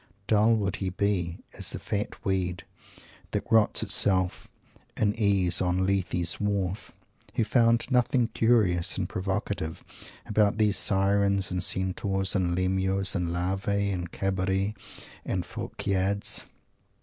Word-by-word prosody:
Dull 110 +3 +4
would 100 -2 -1
he 95 -1 -2
be, 90 -3 -1 0.2
as - - -1
"the - - -3
fat 105 +2 -4
weed 95 -2 -1 0.7
that - - -3
rots 110 0 +4
itself 95 -3 +1 0.5
in 105 -1 +2
case 100 -5 +2
on 90 0 +1
Lethe's 90 -3 0
wharf," 100 -1 -2 0.4
who - - +2
found 115 +1 +3
nothing 125 -1 +2
curious 105 -6 +2
and 95 -2 -1
provocative 95 -4 -3 0.4
about 105 -1 +2
these 105 -2 +3
Sirens 100 0 +2
and 90 -1 -1
Centaurs 95 +1 0
and 90 -3 0
Lemures 95 +1 0
and 90 -3 -1
Larvae 95 +3 -1
and 90 -2 -4
Cabiri 95 +1 -1 0.5
and 90 - -2
Phorkyads! 100 +1 -2
95 Hz, 125 wpm, -27 LUFS, 95-105 Hz, 0.7 s, Dull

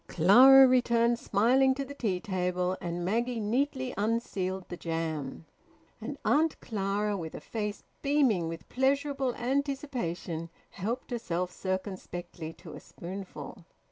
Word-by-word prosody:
Clara 260 +10 +8
returned 235 -2 +3
smiling 260 +6 +3
to 275 0 -3
the 280 - -8
tea 205 -10 -1
table, 180 -2 -1
and 175 0 -3
Maggie 235 +5 0
neatly 260 +4 -1
unsealed 195 -4 -1
the - - -6
jam; 160 -3 -4 0.6
and - - -5
Auntie 315 +2 +3
Clara, 205 0 -1
with 165 -4 -6
a - - -5
face 210 -2 -4 0.2
beaming 270 - +2
with 165 0 -7
pleasurable 275 -1 0
anticipation, 245 - -2 0.2
helped 230 +8 -4
herself 180 -6 -2
circumspectly 185 -3 -5
to - - -12
a - - -8
spoonful. 190 0 -8
210 Hz, 125 wpm, -29 LUFS, 180-255 Hz, 0.6 s, Clara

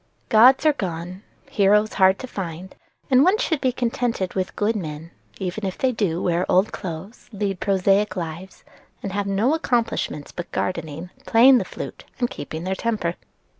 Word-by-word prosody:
Gods 250 +7 +6
are 305 - +6
gone, 180 - -5 0.3
heroes 210 +2 +3
hard 190 -1 +4
to - - -7
find, 185 -4 -6 0.4
and 260 +1 +6
one 375 +6 +4
should 320 -8 -1
be 260 - +2
contented 235 -5 -1
with 185 -1 -3
good 215 +2 +1
men, 160 -3 -6 0.3
even 190 +2 -4
if 190 -2 -3
they 260 - +1
do 195 -8 -1
wear 175 0 +1
old 190 +4 +3
clothes, 185 +4 -7
lead 200 -3 -2
prosaic 195 0 +2
lives, 170 +2 -6 0.4
and 195 - -3
have 200 +1 -2
no 205 +8 +2
accomplishments 235 - -1
but 175 - -7
gardening, 170 0 -3 0.2
playing 250 +3 +7
the 190 - -3
flute, - - -8 0.2
and 245 -1 0
keeping 160 +3 -6
their 190 +1 -1
temper." 210 -5 -1
195 Hz, 170 wpm, -23 LUFS, 180-230 Hz, 0.4 s, playing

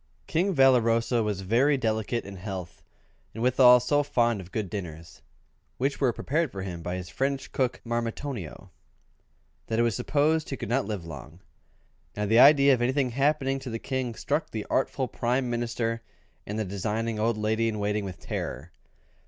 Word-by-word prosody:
King 180 +3 0
Valoroso 120 -3 +4
was 105 -3 -2
very 125 +9 +3
delicate 110 0 -1
in 100 -1 -8
health, 95 -2 -7 0.5
and 110 - -3
withal 125 0 +7
so 145 +4 +2
fond 120 -7 +1
of 95 0 -13
good 105 0 -2
dinners 85 -4 -7 0.6
(which 135 +3 -1
were 130 -3 +4
prepared 150 +5 -1
for 95 -1 -5
him 90 -3 -6
by 90 +2 -3
his 90 -1 -6
French 135 0 -2
cook, 130 -2 -1
Marmitonio), 115 - -4 1.0
that 110 - -1
it 115 - +4
was 115 -4 +1
supposed 155 - +1
he 135 - -4
could - - -6
not 125 -1 +1
live 105 -6 -4
long. 70 -6 -10 0.8
Now 105 - 0
the 110 +3 +4
idea 140 0 +7
of 125 - 0
anything 130 +1 +1
happening 135 +1 +1
to 130 - -7
the 115 - -3
King 130 -1 -3
struck 145 +7 -1
the 110 -2 -5
artful 130 0 0
Prime 125 +1 -1
Minister 115 -1 -2 0.5
and 105 - -4
the 110 - -1
designing 105 +3 -2
old 115 +1 +1
lady 110 +2 +1
in 110 -1 -2
waiting 105 0 -1
with 90 -4 -7
terror. 80 +7 -5
115 Hz, 175 wpm, -27 LUFS, 105-135 Hz, 1.0 s, withal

